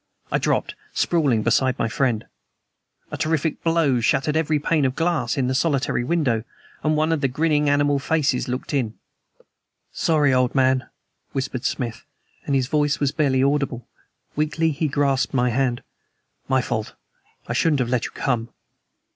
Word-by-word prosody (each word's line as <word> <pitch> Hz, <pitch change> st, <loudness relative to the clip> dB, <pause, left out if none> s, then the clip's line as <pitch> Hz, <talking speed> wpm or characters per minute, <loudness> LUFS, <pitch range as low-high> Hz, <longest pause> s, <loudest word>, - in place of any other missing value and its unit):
I -, -, +2 dB
dropped, -, -, 0 dB, 0.2 s
sprawling, 140 Hz, -10 st, +2 dB
beside 130 Hz, +3 st, +2 dB
my 115 Hz, -, 0 dB
friend. 115 Hz, -2 st, 0 dB, 0.9 s
A -, -, -4 dB
terrific 160 Hz, 0 st, -1 dB
blow 165 Hz, -6 st, +2 dB
shattered 140 Hz, +6 st, +1 dB
every 155 Hz, -1 st, +2 dB
pane 150 Hz, +1 st, +1 dB
of 130 Hz, -1 st, 0 dB
glass 165 Hz, -2 st, 0 dB
in 135 Hz, -, +1 dB
the 130 Hz, -, 0 dB
solitary 140 Hz, -3 st, +1 dB
window, 125 Hz, -7 st, 0 dB, 0.4 s
and 155 Hz, 0 st, +1 dB
one 155 Hz, +1 st, +2 dB
of 160 Hz, -3 st, 0 dB
the 135 Hz, -, +3 dB
grinning 150 Hz, +2 st, +1 dB
animal 145 Hz, 0 st, +2 dB
faces 140 Hz, -3 st, 0 dB
looked 125 Hz, +4 st, -4 dB
in. 120 Hz, -6 st, -1 dB, 1.0 s
"Sorry, 150 Hz, -4 st, +2 dB
old 125 Hz, 0 st, +2 dB
man," 130 Hz, -1 st, +2 dB, 0.4 s
whispered 130 Hz, -1 st, -3 dB
Smith, 120 Hz, -6 st, -3 dB, 0.4 s
and 140 Hz, -, +1 dB
his 130 Hz, -2 st, +2 dB
voice 145 Hz, +1 st, +1 dB
was 140 Hz, -2 st, +1 dB
barely 135 Hz, -4 st, +2 dB
audible. 140 Hz, -3 st, 0 dB, 0.5 s
Weakly 155 Hz, +2 st, +1 dB
he 155 Hz, +2 st, -1 dB
grasped 140 Hz, -2 st, 0 dB
my 125 Hz, -1 st, +2 dB
hand. 125 Hz, -1 st, 0 dB, 0.6 s
"My 130 Hz, -2 st, +2 dB
fault. 110 Hz, -3 st, -3 dB, 0.5 s
I -, -, -3 dB
shouldn't 155 Hz, -4 st, +2 dB
have 125 Hz, -2 st, 0 dB
let 125 Hz, -2 st, 0 dB
you -, -, -6 dB
come." 120 Hz, -4 st, -1 dB
140 Hz, 160 wpm, -23 LUFS, 125-150 Hz, 1.0 s, the